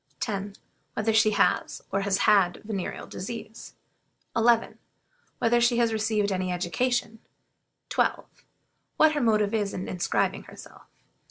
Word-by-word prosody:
10. 200 Hz, -2 st, -3 dB, 0.4 s
Whether 220 Hz, +1 st, 0 dB
she 220 Hz, 0 st, +5 dB
has, 205 Hz, -1 st, +1 dB
or 195 Hz, -, 0 dB
has 195 Hz, -1 st, +1 dB
had, 195 Hz, -4 st, +3 dB
venereal 205 Hz, -4 st, -4 dB
disease? 220 Hz, +2 st, -8 dB, 0.6 s
11. 230 Hz, 0 st, +2 dB, 0.6 s
Whether 240 Hz, 0 st, +2 dB
she 240 Hz, 0 st, +3 dB
has 230 Hz, -2 st, +2 dB
received 215 Hz, -2 st, 0 dB
any 185 Hz, -1 st, -1 dB
education? 225 Hz, +6 st, -1 dB, 0.7 s
12. -, -, 0 dB, 0.7 s
What 315 Hz, 0 st, +6 dB
her 295 Hz, -2 st, -1 dB
motive 215 Hz, -3 st, +2 dB
is 205 Hz, -3 st, -1 dB
in 185 Hz, -, -5 dB
inscribing 180 Hz, -1 st, -1 dB
herself? -, -, -14 dB
215 Hz, 125 wpm, -26 LUFS, 195-230 Hz, 0.7 s, What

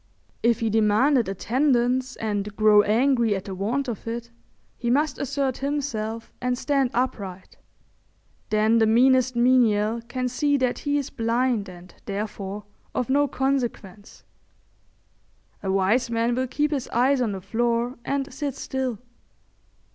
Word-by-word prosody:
If 235 Hz, 0 st, +2 dB
he 225 Hz, -1 st, 0 dB
demand 220 Hz, +6 st, +3 dB
attendance 250 Hz, +4 st, +1 dB
and 205 Hz, -1 st, -3 dB
grow 215 Hz, -1 st, +6 dB
angry 230 Hz, +1 st, +2 dB
at 190 Hz, 0 st, -5 dB
the 195 Hz, -, -5 dB
want 230 Hz, +9 st, -2 dB
of 230 Hz, -2 st, -6 dB
it, 235 Hz, +1 st, -5 dB, 0.4 s
he 235 Hz, -, -3 dB
must 285 Hz, +3 st, +1 dB
assert 275 Hz, -1 st, -1 dB
himself 235 Hz, -6 st, -3 dB
and 250 Hz, 0 st, 0 dB
stand 275 Hz, -1 st, +1 dB
upright. 200 Hz, -7 st, -3 dB, 0.9 s
Then 215 Hz, +2 st, +3 dB
the 220 Hz, -, +4 dB
meanest 255 Hz, +2 st, +4 dB
menial 235 Hz, -3 st, +3 dB
can 255 Hz, +1 st, -2 dB
see 285 Hz, +3 st, +1 dB
that 255 Hz, -2 st, 0 dB
he 290 Hz, 0 st, 0 dB
is 280 Hz, -2 st, -3 dB
blind 230 Hz, -2 st, 0 dB
and, 180 Hz, 0 st, -13 dB
therefore, 205 Hz, 0 st, -5 dB, 0.3 s
of 250 Hz, 0 st, -1 dB
no 285 Hz, +1 st, +3 dB
consequence. 245 Hz, -8 st, -3 dB, 1.4 s
A 195 Hz, -, -2 dB
wise 195 Hz, +6 st, +2 dB
man 230 Hz, +1 st, +1 dB
will 255 Hz, +1 st, -1 dB
keep 295 Hz, +4 st, 0 dB
his 275 Hz, -4 st, -2 dB
eyes 255 Hz, +3 st, +2 dB
on 230 Hz, -4 st, 0 dB
the 190 Hz, -, -5 dB
floor 235 Hz, +5 st, -1 dB
and 275 Hz, +2 st, -2 dB
sit 285 Hz, -3 st, -3 dB
still. 260 Hz, -4 st, -3 dB
240 Hz, 140 wpm, -24 LUFS, 215-260 Hz, 1.4 s, grow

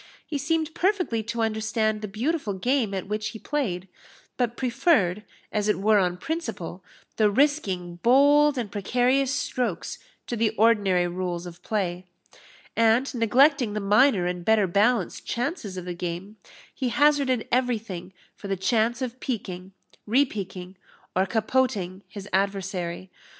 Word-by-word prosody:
He 290 Hz, -, -3 dB
seemed 320 Hz, +2 st, -1 dB
perfectly 360 Hz, -, 0 dB
to 230 Hz, 0 st, -2 dB
understand 220 Hz, 0 st, 0 dB
the 210 Hz, -, -4 dB
beautiful 230 Hz, +3 st, -2 dB
game 245 Hz, +2 st, +1 dB
at 190 Hz, -, -3 dB
which 210 Hz, +1 st, -2 dB
he 225 Hz, -, -8 dB
played, 210 Hz, -10 st, -2 dB, 0.5 s
but 240 Hz, -1 st, -1 dB
preferred, 235 Hz, -, +2 dB, 0.3 s
as 210 Hz, -1 st, 0 dB
it 210 Hz, -, +1 dB
were 210 Hz, +1 st, +4 dB
on 180 Hz, -2 st, 0 dB
principle, 195 Hz, -, -5 dB, 0.3 s
the 215 Hz, -2 st, +4 dB
risking 200 Hz, -, 0 dB
bold 285 Hz, +6 st, +5 dB
and 225 Hz, -5 st, -3 dB
precarious 250 Hz, +6 st, +1 dB
strokes 245 Hz, -9 st, -2 dB, 0.3 s
to 240 Hz, -, -3 dB
the 225 Hz, -1 st, +2 dB
ordinary 205 Hz, -5 st, +3 dB
rules 175 Hz, 0 st, -3 dB
of 175 Hz, 0 st, -10 dB
play; 185 Hz, -4 st, -2 dB, 0.7 s
and 230 Hz, +4 st, +3 dB
neglecting 250 Hz, +1 st, +3 dB
the 210 Hz, -, -1 dB
minor 210 Hz, 0 st, +4 dB
and 180 Hz, 0 st, -3 dB
better 220 Hz, +1 st, +4 dB
balanced 200 Hz, +2 st, +1 dB
chances 240 Hz, -, -3 dB
of 180 Hz, -, -5 dB
the 180 Hz, -, -4 dB
game, 180 Hz, +4 st, -5 dB, 0.4 s
he 260 Hz, -2 st, -2 dB
hazarded 280 Hz, -3 st, +2 dB
everything 225 Hz, -8 st, -1 dB, 0.2 s
for 200 Hz, -, -9 dB
the 195 Hz, -1 st, -1 dB
chance 230 Hz, +5 st, +1 dB
of 255 Hz, 0 st, -5 dB
piqueing, 190 Hz, -6 st, -5 dB, 0.4 s
repiqueing, 195 Hz, -7 st, -1 dB, 0.4 s
or 190 Hz, +1 st, +2 dB
capoting 215 Hz, -4 st, 0 dB
his 200 Hz, +1 st, -9 dB
adversary. 190 Hz, -2 st, -2 dB
215 Hz, 140 wpm, -25 LUFS, 190-255 Hz, 0.7 s, bold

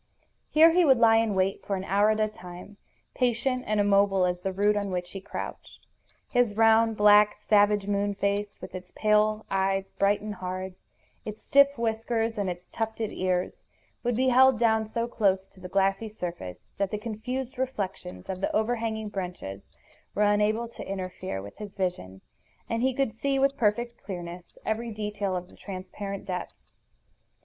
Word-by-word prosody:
Here 320 Hz, +2 st, +7 dB
he 355 Hz, +2 st, +4 dB
would 270 Hz, -5 st, +5 dB
lie 225 Hz, -1 st, +6 dB
in 225 Hz, -3 st, +1 dB
wait 190 Hz, +1 st, 0 dB
for 200 Hz, -, -2 dB
an 190 Hz, -, -4 dB
hour 200 Hz, +2 st, +3 dB
at 215 Hz, 0 st, +1 dB
a 215 Hz, -, +3 dB
time, 180 Hz, 0 st, -11 dB, 0.4 s
patient 250 Hz, +1 st, 0 dB
and 215 Hz, 0 st, +1 dB
immobile 200 Hz, -2 st, +4 dB
as 180 Hz, 0 st, -1 dB
the 190 Hz, -, -2 dB
root 205 Hz, +2 st, +2 dB
on 200 Hz, -1 st, -1 dB
which 180 Hz, -1 st, -3 dB
he 195 Hz, -, -7 dB
crouched. -, -, -8 dB, 0.5 s
His 240 Hz, -4 st, +2 dB
round, 225 Hz, 0 st, +4 dB
black, 210 Hz, 0 st, +6 dB
savage 205 Hz, -1 st, +3 dB
moon 200 Hz, 0 st, 0 dB
face, 200 Hz, +1 st, -1 dB
with -, -, -9 dB
its 180 Hz, 0 st, -8 dB
pale 215 Hz, 0 st, +2 dB
eyes 195 Hz, 0 st, 0 dB
bright 200 Hz, +1 st, +2 dB
and 210 Hz, 0 st, -5 dB
hard, 185 Hz, 0 st, -5 dB, 0.5 s
its 215 Hz, 0 st, -8 dB
stiff 280 Hz, 0 st, +5 dB
whiskers, 225 Hz, 0 st, -1 dB
and 200 Hz, -2 st, 0 dB
its 175 Hz, 0 st, -6 dB
tufted 220 Hz, -1 st, -3 dB
ears, 185 Hz, -1 st, -1 dB, 0.4 s
would 245 Hz, -1 st, 0 dB
be 260 Hz, +2 st, +2 dB
held 260 Hz, 0 st, +6 dB
down 220 Hz, -1 st, +2 dB
so 230 Hz, +2 st, -2 dB
close 195 Hz, -5 st, +1 dB
to -, -, -19 dB
the 180 Hz, 0 st, -8 dB
glassy 195 Hz, +3 st, +1 dB
surface 170 Hz, -, -7 dB
that 200 Hz, -1 st, +1 dB
the 210 Hz, -, -2 dB
confused 250 Hz, +5 st, -5 dB
reflections 195 Hz, -, -4 dB
of 185 Hz, 0 st, -5 dB
the -, -, 0 dB
overhanging 220 Hz, -1 st, -1 dB
branches 180 Hz, -, -6 dB, 0.5 s
were 210 Hz, -, +2 dB
unable 210 Hz, +3 st, +2 dB
to 230 Hz, -, -9 dB
interfere 185 Hz, -, -4 dB
with 100 Hz, -, -11 dB
his 210 Hz, -2 st, -8 dB
vision, 95 Hz, -, -3 dB, 0.5 s
and 230 Hz, 0 st, -1 dB
he 260 Hz, +1 st, +3 dB
could 270 Hz, -5 st, 0 dB
see 275 Hz, +5 st, -1 dB
with 275 Hz, +1 st, +2 dB
perfect 235 Hz, +1 st, 0 dB
clearness 175 Hz, -2 st, -8 dB
every 225 Hz, +2 st, -1 dB
detail 210 Hz, -3 st, -3 dB
of 180 Hz, 0 st, -4 dB
the -, -, -18 dB
transparent 195 Hz, +1 st, -7 dB
depths. 180 Hz, -1 st, -6 dB
210 Hz, 175 wpm, -27 LUFS, 190-225 Hz, 0.5 s, Here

